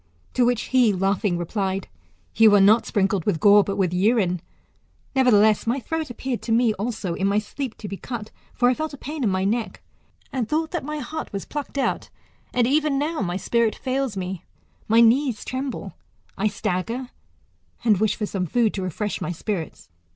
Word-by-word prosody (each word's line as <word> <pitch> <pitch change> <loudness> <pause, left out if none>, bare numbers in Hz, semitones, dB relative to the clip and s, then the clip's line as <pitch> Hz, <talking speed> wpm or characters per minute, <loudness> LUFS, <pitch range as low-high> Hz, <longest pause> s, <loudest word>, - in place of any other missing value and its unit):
To 250 - +3
which 245 -1 +1
he 250 -4 +5
laughing 195 0 0
replied, 190 +2 -2 0.5
You 220 -2 +6
are - - +6
not 210 +4 +5
sprinkled 195 -3 +1
with 180 -6 +1
gore, 205 +2 +7
but 200 - -3
with 185 -3 0
urine; 185 -2 +2 0.7
nevertheless, 220 -5 +4
my 245 +4 +1
throat 320 +5 -3
appeared 245 0 -4
to 230 - -4
me 230 -1 +3
also, 210 -3 -3
in 195 +3 0
my 200 +1 +2
sleep, 230 +4 -4
to 210 - -7
be 195 - -5
cut: 225 -2 -6 0.2
for 245 - +2
I 250 - +4
felt 310 +2 -4
a - - -15
pain 295 +1 -5
in 220 - +2
my 185 0 0
neck, 220 +3 -2 0.5
and 245 -5 -2
thought 315 +1 0
that 350 -3 -2
my 300 +2 -4
heart 310 +3 -5
was 200 -1 -5
plucked 290 -1 -6
out: 275 - -1 0.4
and 245 -1 +2
even 290 +2 +2
now 300 0 -1
my 180 -2 -1
spirit 230 +3 +1
fails 265 -4 -2
me, 185 -1 -4 0.4
my 225 +2 +5
knees 240 0 +3
tremble, 260 +1 -4 0.4
I 215 - +1
stagger, 230 +7 -3 0.7
and 210 -5 +4
wish 220 0 +2
for 215 - -2
some 190 -3 -3
food 230 +3 +2
to 195 - -3
refresh 190 +3 -3
my - - -2
spirits. 175 -1 -5
220 Hz, 190 wpm, -23 LUFS, 195-255 Hz, 0.7 s, gore